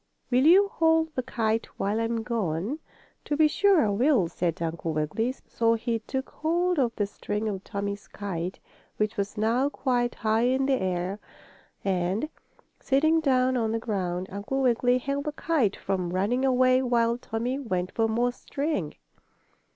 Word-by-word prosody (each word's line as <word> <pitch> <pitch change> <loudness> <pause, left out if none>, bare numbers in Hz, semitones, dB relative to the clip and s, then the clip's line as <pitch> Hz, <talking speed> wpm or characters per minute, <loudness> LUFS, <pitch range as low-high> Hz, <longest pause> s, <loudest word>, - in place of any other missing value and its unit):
Will 255 +4 +4
you 390 +4 +7
hold 320 -3 +2
the 255 - -1
kite 225 -2 -1
while 205 +3 0
I'm 230 0 -1
gone?" 220 - -2 0.5
"To 295 - -1
be 310 0 +6
sure 375 - +4
I - - +1
will," 230 - +3
said 170 0 -2
Uncle 165 -1 -3
Wiggily. 155 - -1
So 230 0 +2
he 230 0 -1
took 265 +4 -5
hold 345 +2 0
of 235 -3 +1
the 205 - 0
string 210 +2 -4
of 195 -2 -3
Tommie's 200 -1 -4
kite, 185 -3 -5 0.4
which 215 +1 0
was 200 0 -3
now 235 +6 +2
quite 245 -4 0
high 220 +2 +1
in 265 +1 +1
the 265 -4 +1
air. 185 +2 -2 0.7
And, 190 +8 0 0.5
sitting 315 +4 +3
down 260 -4 +2
on 225 -3 0
the - - +1
ground, 185 -5 -2
Uncle 205 +8 -2
Wiggily 245 0 +3
held 275 +2 -3
the 300 - -2
kite 285 -12 +1
from 185 -2 -2
running 200 +8 0
away 255 0 +4
while 235 -2 +1
Tommie 245 +3 -3
went 185 -8 -2
for 225 -1 +1
more 240 +2 +1
string. 275 - -3
230 Hz, 165 wpm, -27 LUFS, 200-265 Hz, 0.7 s, you